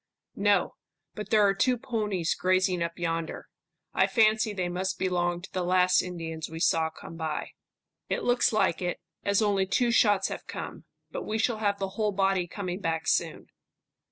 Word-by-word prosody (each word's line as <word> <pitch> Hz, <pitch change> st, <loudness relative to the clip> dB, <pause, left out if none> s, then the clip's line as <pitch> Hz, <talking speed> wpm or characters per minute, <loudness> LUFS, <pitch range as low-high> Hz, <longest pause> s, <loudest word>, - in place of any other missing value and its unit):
"No, 200 Hz, -3 st, +2 dB, 0.4 s
but 210 Hz, -, -7 dB
there 215 Hz, -2 st, +5 dB
are 195 Hz, -, +4 dB
two 250 Hz, +5 st, +2 dB
ponies 210 Hz, -8 st, -1 dB
grazing 185 Hz, -1 st, +1 dB
up 170 Hz, 0 st, -2 dB
yonder. 165 Hz, -1 st, -3 dB, 0.5 s
I -, -, +3 dB
fancy 220 Hz, -2 st, +3 dB
they 185 Hz, -3 st, -2 dB
must 185 Hz, +2 st, -2 dB
belong 175 Hz, -1 st, 0 dB
to 195 Hz, -, -11 dB
the 185 Hz, -, -1 dB
last 180 Hz, 0 st, +4 dB
Indians 165 Hz, -3 st, -5 dB
we 160 Hz, 0 st, -7 dB
saw 160 Hz, -1 st, +2 dB
come 165 Hz, +1 st, -11 dB
by." 160 Hz, -2 st, -3 dB, 0.6 s
"It -, -, -1 dB
looks 245 Hz, 0 st, +3 dB
like 215 Hz, -6 st, +1 dB
it, 180 Hz, -1 st, -2 dB, 0.2 s
as 200 Hz, +2 st, +2 dB
only 200 Hz, -2 st, +2 dB
two 240 Hz, +5 st, +2 dB
shots 205 Hz, -4 st, +3 dB
have -, -, -7 dB
come. -, -, -7 dB, 0.3 s
But -, -, -4 dB
we 215 Hz, -, -1 dB
shall 225 Hz, +1 st, +1 dB
have 205 Hz, -2 st, +1 dB
the 195 Hz, -1 st, -3 dB
whole 210 Hz, +1 st, -1 dB
body 195 Hz, -2 st, +1 dB
coming 185 Hz, 0 st, -4 dB
back 165 Hz, -4 st, -2 dB
soon." -, -, 0 dB
190 Hz, 180 wpm, -28 LUFS, 175-210 Hz, 0.6 s, there